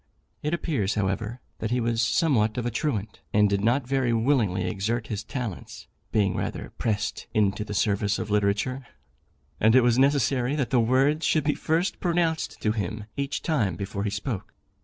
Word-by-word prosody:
It 150 - -1
appears, 120 - -1
however, 105 +4 -2 0.2
that 110 - -2
he 125 +1 +1
was 115 -1 0
somewhat 115 -3 +2
of 120 - -2
a 120 - 0
truant, 110 -5 -2
and 105 0 +5
did 100 0 0
not 120 +4 +2
very 130 -2 +1
willingly 110 -7 +1
exert 105 +5 -1
his 105 0 -3
talents, 120 - -6 0.3
being 100 -3 +2
rather - - -4
pressed 105 -3 -2
into 105 0 +2
the 105 0 -6
service 100 0 +1
of 105 -2 -4
literature, 105 +6 0 0.7
and 110 +2 +5
it 130 - +8
was 120 0 +3
necessary 135 -1 +2
that 140 -5 -1
the 125 - +4
words 135 +7 +3
should 155 - +2
be 150 0 +2
first 165 +4 0
pronounced 170 -2 0
to 110 - +3
him 105 0 -3
each 140 0 -3
time 115 - +1
before 100 +2 -4
he 105 - 0
spoke. 100 +1 -4
115 Hz, 180 wpm, -26 LUFS, 105-135 Hz, 0.7 s, it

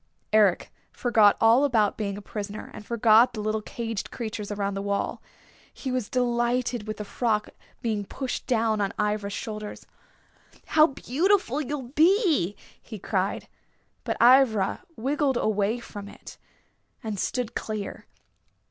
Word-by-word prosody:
Eric 205 -5 +3 0.2
forgot 220 -4 +4
all 230 +5 +5
about 225 -7 +2
being 200 -2 -3
a 205 - -9
prisoner, 205 0 -6
and - - -9
forgot 230 +2 +4
the 220 - -6
little 215 +1 -1
caged 225 -2 -5
creatures 215 -3 -5
around 200 -1 -2
the 195 - -3
wall. 200 0 -2 0.5
He 265 - -5
was 250 -4 -2
delighted 240 -2 0
with 215 -1 -4
the 210 - -5
frock 210 -1 -1 0.3
being 215 -3 -1
pushed 260 +5 -5
down 225 -3 +1
on 200 +1 -1
Ivra's 210 -1 -1
shoulders. 215 0 -6 0.8
"How 310 0 +5
beautiful 300 - +1
you'll 275 -3 -5
be!" 315 - +3 0.3
he 220 - -9
cried. 195 0 -2 0.6
But - - -2
Ivra 235 -5 +5 0.2
wriggled 275 +2 0
away 215 +2 0
from 205 -3 -9
it - - -13 0.6
and 215 -3 -4
stood 245 +1 -2
clear. 215 -2 -5
220 Hz, 140 wpm, -26 LUFS, 210-250 Hz, 0.8 s, all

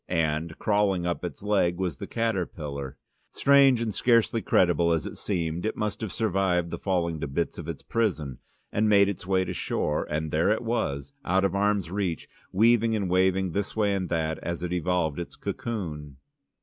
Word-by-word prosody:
And 80 -1 -1
crawling 100 -4 +1
up 85 0 -2
its 90 - -6
leg 95 -4 +2
was 90 -7 -2
the - - -6
caterpillar. 75 -11 -3 0.3
Strange 140 -3 +5
and 110 -3 -1
scarcely 115 0 +3
credible 85 -3 +3
as 80 - -1
it - - -6
seemed, 85 -4 -2
it 110 - -2
must 105 -1 -2
have 110 -4 -3
survived 95 -5 0
the - - -4
falling 85 -4 -1
to 80 - -3
bits 80 +6 -2
of 85 - -7
its 85 -3 -6
prison, 80 - -1 0.3
and 105 +1 +2
made 100 -1 +5
its 95 -2 -6
way 95 -1 +2
to - - -4
shore, 75 0 -1
and 75 0 -2
there 80 +5 +2
it 110 +3 +1
was, 70 - -2
out 95 +2 +2
of 95 - 0
arm's 100 -3 +1
reach, 95 -5 -2 0.2
weaving 115 +2 +4
and 100 -4 -1
waving 95 0 +2
this 100 +3 -2
way 105 -2 +2
and 95 -2 -2
that 80 -1 -1
as 85 0 -4
it 90 0 -2
evolved 90 -3 0
its 85 - -6
cocoon. 75 - -5
90 Hz, 190 wpm, -27 LUFS, 80-105 Hz, 0.3 s, Strange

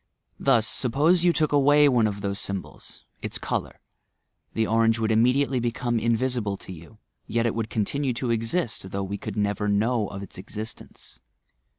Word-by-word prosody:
Thus, 120 -5 +3
suppose 150 +11 +3
you 175 - +5
took 155 -3 +1
away 145 +1 +5
one 120 -5 +3
of 100 -1 -4
those 100 0 -2
symbols,— 100 -2 -6 0.2
its - - -3
colour, - - -4 0.4
— - - -49
the 110 - +2
orange 115 +1 +2
would 110 -1 0
immediately 125 +4 +3
become 120 0 -1
in 115 0 +1
visible 120 -5 -1
to 95 - -9
you; 85 +6 -14 0.3
yet 115 0 0
it 115 - +1
would 115 -1 -3
continue 130 +6 -1
to 120 +1 -3
eiist, 115 - -1
though 100 +1 -3
we 100 +1 -4
could - - -6
never 105 0 0
know 105 +2 +1
of 100 0 -7
its 95 - -11
existence. 105 - -9
115 Hz, 180 wpm, -25 LUFS, 105-125 Hz, 0.4 s, you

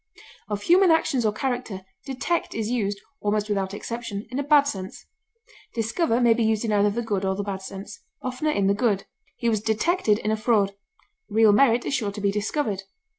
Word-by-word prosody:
Of 205 -1 -3
human 370 +2 +5
actions 270 -7 +2
or - - +2
character, 235 -5 -3 0.2
detect 270 +6 -2
is 225 0 -2
used, 205 -4 -1 0.2
almost 210 0 -1
without 195 -2 -1
exception, 230 -2 -5
in 255 - -2
a - - 0
bad 290 0 +5
sense; 190 -9 -6 0.7
discover 230 +3 +1
may 240 -2 +5
be 230 0 0
used 220 0 +1
in 220 - -1
either 205 0 +3
the 235 +4 -2
good 205 -4 -1
or 190 0 0
the 205 - -3
bad 195 -1 -4
sense, 195 +2 -8 0.2
oftener 255 +4 -2
in 200 -10 +1
the 200 - +4
good; 205 -2 0 0.3
he 235 - -3
was 220 -3 +1
detected 220 - +1
in 215 -1 -2
a - - +2
fraud; 215 -3 +2 0.6
real 220 0 +5
merit 240 +2 +4
is - - -2
sure 220 -7 0
to 210 - -6
be 200 0 +2
discovered. 210 0 -1
220 Hz, 200 wpm, -25 LUFS, 205-250 Hz, 0.7 s, human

